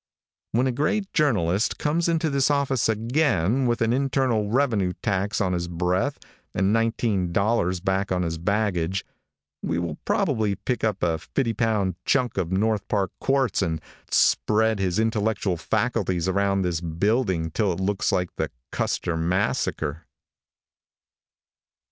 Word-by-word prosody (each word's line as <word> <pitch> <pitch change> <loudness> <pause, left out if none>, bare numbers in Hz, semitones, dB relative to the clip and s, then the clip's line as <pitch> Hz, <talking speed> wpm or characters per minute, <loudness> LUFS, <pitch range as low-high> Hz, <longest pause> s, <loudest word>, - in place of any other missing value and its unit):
When 120 +3 +3
a 130 - +1
great 170 - -1
journalist 105 - +1
comes 165 +3 0
into 160 -2 +1
this 140 0 +2
office 140 -5 +1
again 115 - +1
with 120 -1 0
an 115 +1 +2
internal 130 -5 +1
revenue 110 -7 +1
tax 100 -1 0
on 95 -2 +1
his 85 -1 -2
breath 90 +2 0 0.4
and 95 +2 +2
nineteen 115 -5 +1
dollars 95 -2 +1
back 95 +1 0
on 90 -1 +1
his 80 -1 -3
baggage, 95 -2 0 0.6
we 85 - -1
will 85 -1 -3
probably 105 -2 +1
pick 125 +4 -3
up 105 -3 0
a 80 -2 +1
fifty 115 - -1
pound 105 -5 0
chunk 125 -7 +1
of 90 -2 -2
North 105 +2 0
Park 100 -3 0
quartz 135 -2 +1
and 80 -1 -1 0.3
spread 110 0 +3
his 95 -1 0
intellectual 110 -3 0
faculties 95 +1 -1
around 100 0 +1
this 85 -2 -1
building 85 0 0
till 105 +2 +1
it 85 - -4
looks 95 +1 0
like 90 -1 -1
the - - -1 0.2
Custer 85 - -1
massacre. 80 -3 -1
100 Hz, 140 wpm, -24 LUFS, 90-120 Hz, 0.6 s, When